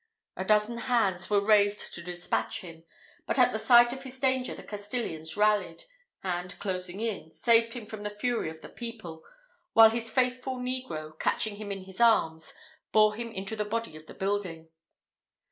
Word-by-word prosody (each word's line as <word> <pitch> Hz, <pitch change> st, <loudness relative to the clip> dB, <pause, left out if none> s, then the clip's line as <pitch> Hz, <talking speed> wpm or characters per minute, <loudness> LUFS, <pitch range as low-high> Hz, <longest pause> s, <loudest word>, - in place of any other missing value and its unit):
A 190 Hz, -, -3 dB
dozen 215 Hz, +3 st, +2 dB
hands 200 Hz, -8 st, +1 dB
were 200 Hz, -1 st, +2 dB
raised 205 Hz, -1 st, +3 dB
to 170 Hz, -, -7 dB
despatch 170 Hz, -11 st, -2 dB
him; 165 Hz, -2 st, -12 dB, 0.4 s
but -, -, -1 dB
at -, -, +5 dB
the -, -, -1 dB
sight 240 Hz, -1 st, +6 dB
of 265 Hz, -, -7 dB
his 260 Hz, -1 st, -9 dB
danger 260 Hz, -1 st, +1 dB
the -, -, -10 dB
Castilians 205 Hz, -7 st, -4 dB
rallied, 210 Hz, -, +1 dB, 0.4 s
and 180 Hz, 0 st, -3 dB
closing 185 Hz, -1 st, -3 dB
in, 220 Hz, -7 st, -3 dB
saved 230 Hz, +6 st, +2 dB
him 235 Hz, -3 st, -6 dB
from 215 Hz, -1 st, -8 dB
the 210 Hz, -, -3 dB
fury 210 Hz, -2 st, -2 dB
of 160 Hz, 0 st, -11 dB
the -, -, -10 dB
people; 220 Hz, -9 st, -7 dB, 0.5 s
while 225 Hz, -1 st, +8 dB
his 230 Hz, 0 st, -2 dB
faithful 255 Hz, +2 st, 0 dB
negro, 250 Hz, -12 st, -4 dB
catching 215 Hz, -2 st, 0 dB
him 210 Hz, -1 st, -6 dB
in 195 Hz, -1 st, -5 dB
his 190 Hz, +4 st, -7 dB
arms, 160 Hz, -9 st, +3 dB, 0.4 s
bore 215 Hz, -1 st, +5 dB
him 230 Hz, +1 st, -5 dB
into 195 Hz, +1 st, -3 dB
the 210 Hz, -, -1 dB
body 225 Hz, -4 st, -3 dB
of 155 Hz, 0 st, -13 dB
the -, -, -11 dB
building. 190 Hz, -5 st, -3 dB
210 Hz, 180 wpm, -28 LUFS, 180-235 Hz, 0.5 s, while